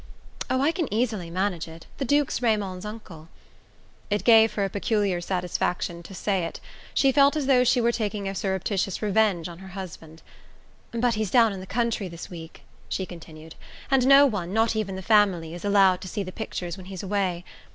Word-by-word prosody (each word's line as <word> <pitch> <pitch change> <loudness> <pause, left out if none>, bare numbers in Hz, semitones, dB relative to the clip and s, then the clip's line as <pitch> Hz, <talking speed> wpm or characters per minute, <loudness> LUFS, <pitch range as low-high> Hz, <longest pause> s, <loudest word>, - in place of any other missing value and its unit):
"Oh, 260 0 +1
I 290 +4 +3
can 335 -3 -3
easily 215 -6 -1
manage 185 -1 -2
it: 165 0 -12
the 275 - -1
Duke's 285 +1 +1
Raymond's 205 -5 0
uncle." 180 -7 -10 0.8
It 205 0 0
gave 225 -2 +6
her 200 -2 0
a - - -2
peculiar 200 -3 0
satisfaction 175 -1 -2
to 185 +3 -11
say 195 -1 0
it: - - -6 0.4
she 275 - +4
felt 280 +2 +4
as 300 -3 -1
though 260 -2 +4
she 250 0 +3
were 235 0 +3
taking 210 -3 -3
a 195 - -3
surreptitious 195 0 -2
revenge 205 -5 +2
on 170 -1 -10
her 190 - -11
husband. 165 -4 -9 0.7
"But 235 +1 +1
he's 215 -2 -1
down 230 -2 +4
in 195 - -6
the 185 - -9
country 230 -2 -1
this 170 +1 -9
week," 165 -2 -10 0.3
she 190 - -2
continued, 160 -2 -11 0.4
"and 260 -2 +4
no 275 +1 +8
one 195 -9 -2
not 225 +1 +2
even 205 -3 -2
the 190 - -6
family 190 -6 +3
is 175 - -8
allowed 195 -3 +4
to 190 - -7
see 205 +2 -3
the 185 - -7
pictures 180 -5 -5
when 185 -1 -11
he's 190 -1 -7
away. 185 -3 -1
200 Hz, 195 wpm, -25 LUFS, 180-225 Hz, 0.8 s, no